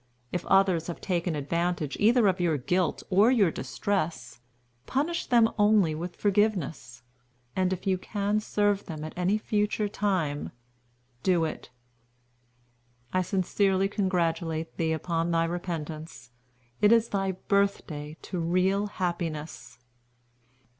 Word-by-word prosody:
If 175 - -3
others 190 -4 +3
have 170 - -5
taken 175 -3 -1
advantage 170 +1 -1
either 225 +1 +5
of 185 -1 +1
your 170 -4 +1
guilt 175 +5 0
or 200 +5 +5
your 210 -9 +4
distress, 135 - -3 0.5
punish 310 +6 -1
them 235 -3 +5
only 205 -6 +4
with 170 +3 -5
forgiveness; 185 - 0 0.5
and 185 -1 +1
if 185 +1 -4
you 190 -2 +1
can 205 +1 -1
serve 205 -1 0
them 155 -3 -6
at 155 - -6
any 180 +4 +1
future 210 0 0
time, 185 -8 -1 0.7
do 175 -1 +2
it. 155 - -6 1.4
"I 185 - +3
sincerely 190 +1 +1
congratulate 170 -5 -1
thee 160 -1 0
upon 165 +1 -1
thy 165 -1 +2
repentance. 160 -6 -5 0.5
It 210 - +6
is 230 0 +4
thy 195 -1 -1
birthday 175 -6 -1
to 180 - -4
real 185 +4 +1
happiness." 165 - -4
180 Hz, 125 wpm, -28 LUFS, 160-200 Hz, 1.4 s, It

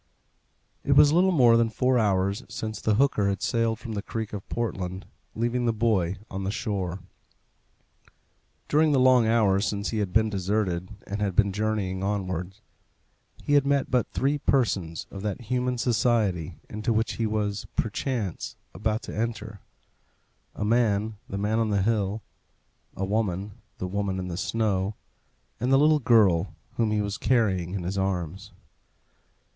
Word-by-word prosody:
It 140 - +3
was 145 +1 +6
little 185 +3 +4
more 125 -8 +6
than 115 -1 +3
four 125 +3 +2
hours 100 +1 +1
since 110 0 -5
the 110 - +2
hooker 110 -5 +2
had 100 - -3
sailed 115 -2 +1
from 115 +1 -8
the 100 - -2
creek 110 0 -5
of 100 -2 -7
Portland, 95 -5 -3 0.3
leaving 120 +2 0
the - - +4
boy 105 -5 +1
on 95 0 -5
the 95 - -1
shore. 95 -4 -3 1.7
During 155 0 +3
the 135 - +4
long 125 -3 +5
hours 105 -3 +3
since 100 0 -2
he 110 - -1
had 100 -3 -1
been 110 +3 +3
deserted, 95 -3 -1 0.2
and 100 +1 -4
had 100 -3 -1
been 100 -1 +3
journeying 105 -3 -1
onwards, 95 -1 -3 0.8
he 145 - 0
had 145 -1 +6
met 140 0 +1
but 125 -2 +2
three 140 +2 0
persons 100 - 0
of 100 - -7
that 105 -2 -3
human 125 +2 -1
society 110 - +1
into 110 +3 -2
which 110 0 0
he 115 - 0
was, 105 -1 -2
perchance, 110 - -2 0.2
about 110 +4 -1
to - - -7
enter 110 -2 -3 1.0
a 105 - -2
man, 110 -2 +1
the 100 - -4
man 105 +3 0
on 110 -1 +1
the 100 -2 +1
hill; 105 -1 0 0.7
a 95 - -2
woman, 100 -1 -1 0.3
the - - -4
woman 100 0 -2
in 90 -1 -4
the 85 - -4
snow; 100 +1 -1 0.6
and 125 +3 0
the 135 - +6
little 150 +2 +5
girl 100 - +3 0.2
whom 115 -2 +2
he 105 0 +1
was 100 0 -3
carrying 95 -8 +1
in 95 - -3
his 95 +3 -2
arms. 95 +1 -3
105 Hz, 160 wpm, -26 LUFS, 95-115 Hz, 1.7 s, was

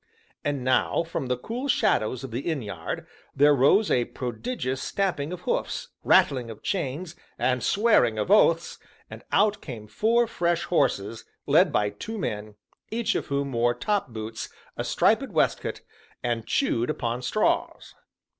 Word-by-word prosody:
And 145 -3 -1
now, 130 +5 +2
from 165 -5 -4
the 125 0 0
cool 240 - -4
shadows 125 - +1
of 135 - -6
the 120 - -2
inn 145 -3 -2
yard, 100 -2 -5 0.3
there 145 +2 +6
rose 145 - +4
a 120 -1 +3
prodigious 130 - -4
stamping 180 -7 -1
of 180 -1 -6
hoofs, - - -2
rattling 125 -4 +4
of 110 - -10
chains, 170 -1 -3 0.2
and 125 -1 +1
swearing 200 - +3
of 110 - -1
oaths, 170 -5 +4 0.3
and - - -9
out 210 +1 +3
came 115 -7 -8
four 230 - +2
fresh 175 -6 0
horses, 115 - 0 0.2
led 160 +4 +4
by 105 -6 +1
two 225 - -6
men, 105 - -4 0.3
each 230 0 0
of - - -2
whom 140 -1 -1
wore 120 0 +2
topboots, 115 - -3 0.3
a - - -3
striped - - +2
waistcoat, - - 0 0.4
and 120 -2 -2
chewed 120 - +1
upon 120 +1 -2
straws. 210 +12 0
140 Hz, 150 wpm, -26 LUFS, 120-190 Hz, 0.4 s, there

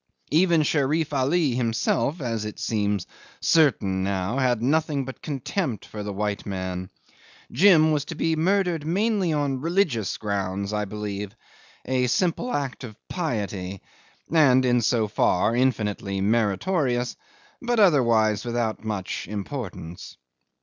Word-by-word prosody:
Even 165 0 +4
Sherif 150 +1 +1
Ali 140 +3 +2
himself, 120 +5 0
as 115 -4 -2
it 105 0 -6
seems 105 -4 -1 0.3
certain 105 - +2
now, 95 +5 -1
had 125 -3 +2
nothing 145 +2 +1
but 130 - -9
contempt 135 - -3
for 105 - -7
the 105 0 -4
white 100 0 -2
man. 95 -2 -4 0.6
Jim 165 -5 +5
was 145 -2 0
to 165 - -6
be 160 +1 0
murdered 175 -1 +1
mainly 195 +2 +1
on 140 -3 -1
religious 160 - 0
grounds, 100 -1 -2
I 105 0 -1
believe. 105 -1 -5 0.5
A 125 0 +1
simple 180 - 0
act 135 -2 -3
of 110 -4 -9
piety 100 - -3 0.5
(and 130 -6 +4
so 110 -1 +2
far 105 +1 +2
infinitely 105 -6 0
meritorious), 120 - +1 0.5
but 240 -1 0
otherwise 115 - +4
without 120 -2 -2
much 105 -4 -4
importance. 100 - -6
120 Hz, 125 wpm, -25 LUFS, 105-155 Hz, 0.6 s, Jim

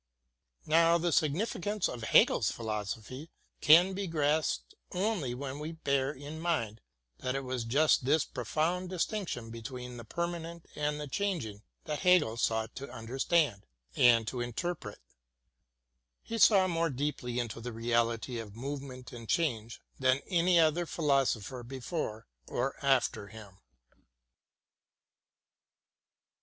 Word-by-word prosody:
Now 165 +2 +5
the 170 0 0
significance 190 +6 0
of 120 - -6
Hegel's 110 - +4
philosophy 110 +6 -5 0.3
can 175 +5 +7
be 195 0 -3
grasped 155 -1 0 0.2
only 180 - -1
when 135 +2 -5
we 155 +2 -5
bear 140 -4 0
in 145 +2 -8
mind 115 -11 -1 0.4
that 130 +1 -2
it 135 - -2
was 130 -2 -3
just 140 +4 +3
this 145 +4 +3
profound 160 +8 -1
distinction 180 - -3
between 125 +1 -7
the 115 - -8
permanent 170 +4 -4
and 150 0 -1
the 150 - -5
changing 135 - -2 0.2
that 150 -1 -3
Hegel 180 -11 +4
sought 110 -1 0
to 140 -1 -7
under 120 +2 -7
stand 145 - +2 0.3
and 120 -4 +5
to 125 +1 -3
interpret. 120 - -4 1.3
He 230 0 -4
saw 195 -3 +6
more 165 -1 +1
deeply 130 -3 -3
into 115 -2 -3
the 125 +1 -5
reality 115 +1 0
of 105 -2 -8
movement 135 0 -6
and 115 -2 -9
change 120 -9 -1 0.2
than 130 +1 +3
any 175 -1 +3
other 165 +2 +3
philosopher 135 - 0
be 130 +3 -8
fore 120 -6 -4 0.2
or 135 - -1
after 130 -6 +2
him. 100 -2 -12
140 Hz, 130 wpm, -31 LUFS, 120-165 Hz, 1.3 s, can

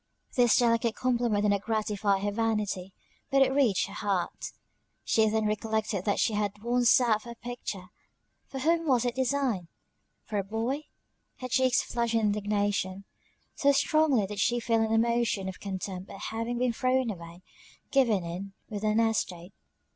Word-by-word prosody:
This 245 -3 +5
delicate 230 -1 +2
compliment 240 -4 +1
did 210 - +3
not 200 -1 +1
gratify 210 -2 0
her 205 +1 -1
vanity, 210 -4 -1 0.4
but 275 0 +5
it 265 0 +1
reached 255 -9 +3
her 195 - -10
heart. 200 -3 -2 0.5
She 220 -1 +3
then 220 0 0
recollected 215 -2 -1
that 205 - +1
she 225 - +2
had 205 0 -2
once 240 0 +2
sat 230 -4 +4
for 240 - -11
her 235 - -7
picture 235 -6 -6 0.6
for 270 - -7
whom 330 +2 +1
was 250 -3 +3
it 245 - 0
designed? 260 -8 0 0.6
For 210 -2 -3
a - - -1
boy! 230 +9 -3 0.5
Her 255 - -5
cheeks 255 0 +3
flushed 235 -1 -1
with 225 - +2
indignation, 205 -2 0 0.5
so 280 - +3
strongly 285 -4 +3
did 205 +1 -6
she 240 +4 +2
feel 230 -1 +1
an 220 0 0
emotion 230 -3 +1
of 190 - -6
contempt 190 -1 -5
at 195 - -9
having 230 +2 -3
been 245 -1 +1
thrown 255 0 +1
away 170 -1 -10 0.5
given 235 -9 +3
in 180 +4 -6 0.2
with 210 -2 -5
an 215 +1 +2
estate. 195 -5 -1
220 Hz, 170 wpm, -28 LUFS, 200-245 Hz, 0.6 s, This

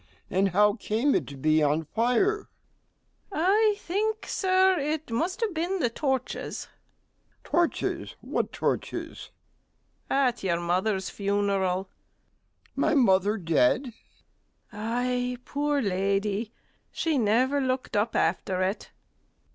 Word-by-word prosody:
and 195 +2 +2
how 205 +3 +4
came 230 +5 0
it - - 0
to 140 - -9
be 155 +3 +3
on 150 +2 +2
fire? 250 - +1 0.8
STEWARD. 340 -4 -2
I 425 +1 +4
think, 430 +4 -2
Sir, 375 -1 +3
it 300 -1 -3
must 335 - -1
have 440 -5 0
been 345 +4 -1
the 245 -10 0
torches. 265 0 -2
MR - - -36
G. - - -16 0.3
Torches! - - -3
what - - -2
torches? - - -3 0.8
STEWARD. - - -37 0.2
At 245 -1 -3
your 170 -3 0
mother's 190 +3 0
funeral. 200 -2 0
MR. 190 - -38
G. - - -30
My 310 +3 +2
mother 205 -4 +3
dead? 165 - +2
STEWARD. 255 -4 -9 0.8
Ay, 245 +3 -1
poor 290 0 0
lady, 200 +2 0 0.4
she 315 -4 0
never 250 +6 +2
looked 255 -2 -2
up 210 +2 +1
after 185 -1 +1
it. 190 +3 -2
230 Hz, 130 wpm, -27 LUFS, 195-295 Hz, 0.8 s, how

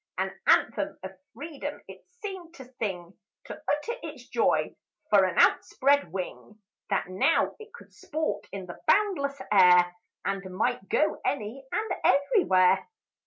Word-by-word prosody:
An - - -1 0.2
anthem 300 - +2
of 190 - -6 0.2
freedom 290 +3 -6
it - - -12 0.2
seemed 370 -5 -7
to 265 - -11
sing; 180 -4 -4 0.3
To - - -7
utter 465 +12 -3
its - - -9
joy - - +1 0.4
for - - +6
an - - -3
outspread 280 - +3
wing, 190 +3 -6 0.3
That 195 -2 0
now 185 +1 +2
it 435 0 -12
could 480 - -15
sport 315 0 -3
in 195 -2 -6
the 175 - -10
boundless 335 -10 +2
air, 180 -3 +6 0.3
And 195 -2 -3
might 225 -3 -1
go 305 - +1
any 260 +1 -3
and 435 0 -2
every 340 - +3
where. 185 0 +4
255 Hz, 145 wpm, -27 LUFS, 190-315 Hz, 0.4 s, for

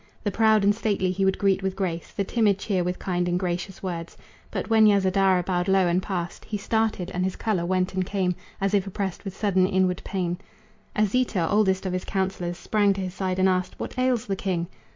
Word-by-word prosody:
The 205 - 0
proud 220 0 +4
and 205 +1 +5
stately 205 -4 0
he 195 +1 -1
would 190 - +2
greet 195 -1 +2
with 190 0 -2
grace, 175 -4 -3
The 200 - -1
timid 205 -1 +2
cheer 195 -3 -1
with 180 +1 -2
kind 180 -2 -1
and 175 - +1
gracious 180 +1 -3
words. 170 -3 -5 0.3
But - - -3
when 220 -1 +5
Yasodhara 190 -2 +3
bowed 180 0 -1
low 190 -1 +4
and 175 +1 +2
passed, 175 -3 -4
He 210 - -4
started, 215 -3 -1
and 180 - -1
his 190 0 -1
color 190 -7 -1
went 185 0 0
and 185 0 0
came 185 -1 0 0.3
As 195 +1 0
if 200 -1 +2
oppressed 195 -1 -4
with 195 -2 -7
sudden 190 -3 +2
inward 185 -1 +1
pain. 180 -2 -2 0.6
Asita, 215 -4 +1
oldest 195 -1 +2
of 185 - -1
his 185 - -2
counselors, 185 -3 -2
Sprang 205 +1 +2
to 195 - -4
his 185 -1 -4
side 185 -1 -2
and 190 0 +4
asked: 185 -1 -1
"What - - -5
ails 250 -2 +1
the 195 - -1
king?" 180 -3 -2
190 Hz, 215 wpm, -25 LUFS, 180-200 Hz, 0.6 s, and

